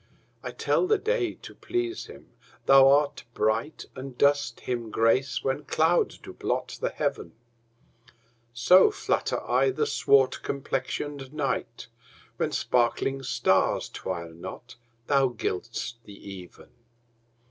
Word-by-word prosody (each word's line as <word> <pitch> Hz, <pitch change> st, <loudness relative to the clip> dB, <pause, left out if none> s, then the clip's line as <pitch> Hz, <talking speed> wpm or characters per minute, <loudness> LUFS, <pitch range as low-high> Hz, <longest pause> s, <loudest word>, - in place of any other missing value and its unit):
I -, -, -5 dB
tell 365 Hz, -, 0 dB
the 435 Hz, +2 st, +3 dB
day, 435 Hz, -3 st, -1 dB
to -, -, -9 dB
please 360 Hz, 0 st, -3 dB
him -, -, -14 dB, 0.3 s
thou 135 Hz, 0 st, +7 dB
art 145 Hz, +1 st, +2 dB
bright, 115 Hz, +8 st, -1 dB
And 130 Hz, -1 st, -8 dB
dost 140 Hz, -4 st, +2 dB
him 120 Hz, -3 st, -3 dB
grace 115 Hz, +5 st, +1 dB
when 135 Hz, +2 st, -2 dB
clouds 165 Hz, +2 st, +2 dB
do -, -, -11 dB
blot -, -, -3 dB
the -, -, 0 dB
heaven: 85 Hz, -, -3 dB, 1.2 s
So 125 Hz, -, +6 dB
flatter 420 Hz, -, -2 dB
I -, -, +3 dB
the 400 Hz, +3 st, 0 dB
swart 135 Hz, -, +3 dB
complexion'd 140 Hz, 0 st, -4 dB
night, 135 Hz, -5 st, -2 dB, 0.5 s
When -, -, -1 dB
sparkling 125 Hz, +2 st, 0 dB
stars 130 Hz, -, +1 dB
twire 85 Hz, -3 st, -5 dB
not 95 Hz, +9 st, -9 dB, 0.3 s
thou 135 Hz, 0 st, +3 dB
gild'st 115 Hz, +5 st, -3 dB
the 100 Hz, -, -11 dB, 0.2 s
even. 90 Hz, -3 st, -12 dB
135 Hz, 125 wpm, -27 LUFS, 115-150 Hz, 1.2 s, thou